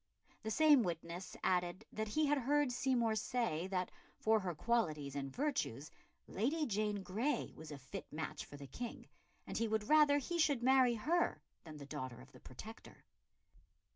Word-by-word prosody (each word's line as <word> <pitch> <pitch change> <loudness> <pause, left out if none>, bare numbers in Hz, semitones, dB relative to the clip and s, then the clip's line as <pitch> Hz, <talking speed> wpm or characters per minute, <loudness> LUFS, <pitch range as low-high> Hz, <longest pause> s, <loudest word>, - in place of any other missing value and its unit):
The 220 - -4
same 295 +3 +6
witness 170 -1 -4
added 180 +2 +1
that 220 0 -2
he 305 +9 +2
had 290 0 +3
heard 285 +1 +2
Seymour 245 -3 +2
say 215 -6 -1
that, 185 -1 -1 0.3
for 220 0 +3
her 180 -4 -3
qualities 155 - 0
and 135 -1 -3
virtues, 250 - -2 0.4
Lady 290 - 0
Jane 210 -3 -1
Grey 230 +11 -1
was 155 -1 -9
a 145 - -6
fit 130 -1 -8
match 155 +1 -4
for 145 - -11
the 140 - -8
King, 240 - -7 0.4
and - - -3
he 230 - +1
would 215 -1 -1
rather 300 -2 +6
he 340 +5 -2
should 285 -6 +3
marry 260 -2 +5
her 330 +11 +1 0.2
than 155 -2 -9
the 140 - -8
daughter 130 -4 -5
of 130 +1 -14
the - - -15
Protector. 215 - -11
220 Hz, 170 wpm, -37 LUFS, 160-265 Hz, 0.4 s, same